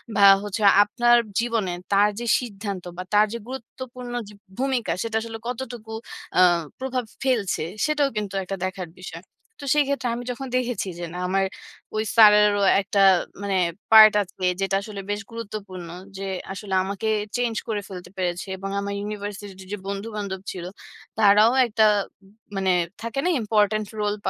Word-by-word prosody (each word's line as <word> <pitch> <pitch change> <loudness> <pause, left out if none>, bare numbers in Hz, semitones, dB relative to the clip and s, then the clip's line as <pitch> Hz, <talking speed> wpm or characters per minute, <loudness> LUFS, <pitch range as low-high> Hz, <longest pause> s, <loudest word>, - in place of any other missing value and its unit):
বা 200 - +4 0.2
হচ্ছে 210 +1 -4 0.2
আপনার 240 +3 +3 0.2
জীবনে 230 -5 0 0.2
তার 205 +1 +5
যে 240 - -4
সিদ্ধান্ত 200 -5 -6
বা 185 - -4
তার 210 +1 +6
যে - - -2
গুরুত্বপূর্ণ 250 -1 -8
যে 210 - -12 0.2
ভূমিকা, 260 -2 0
সেটা 225 -1 -3
আসলে 225 0 -6
কতটুকু 240 -3 -6 0.5
আ - - +7 0.4
প্রভাব 260 -1 -2 0.2
ফেলছে। 230 -11 0 0.2
সেটাও 300 -2 +2
কিন্তু 205 -2 -3
একটা 195 +1 -4
দেখার 185 -2 -5
বিষয়। 170 -2 -8 0.4
তো - - -10
সেই 295 0 +4
ক্ষেত্রে 275 -2 -1
আমি 245 - -5
যখন 265 +2 -6
দেখেছি 245 -4 -2
যে, 175 - -3
না, 180 - -6
আমার 195 +1 +1 0.5
ওই 215 - +1
স্যারেরও 210 -2 +6 0.2
একটা 200 +1 0 0.4
মানে 200 -1 -1 0.4
পার্ট 215 -1 +10
আছে, 185 -1 -8 0.2
যেটা 195 0 +1
আসলে 205 -1 -7
বেশ 205 0 -2
গুরুত্বপূর্ণ। 205 -6 -7 0.3
যে 195 - -5 0.3
আসলে 195 0 -6
আমাকে 200 +3 -4 0.3
চেঞ্জ 245 -2 0
করে 215 -3 -2
ফেলতে 180 -2 -9
পেরেছে। 180 0 -2
এবং 195 +1 -5
আমার 200 0 -3
ইউনিভার্সিটি 205 0 -5
তে 190 - -10
যে - - -2
বন্ধু-বান্ধব 200 -1 -4
ছিল, 180 - -7 0.5
তারাও 210 +1 +6
একটা 220 -1 +2 0.7
মানে 190 -1 0 0.3
থাকে 230 +3 -3
না, - - +3
ইম্পোর্টেন্ট 215 -1 +1
রোল 205 0 0
210 Hz, 160 wpm, -24 LUFS, 195-235 Hz, 0.7 s, পার্ট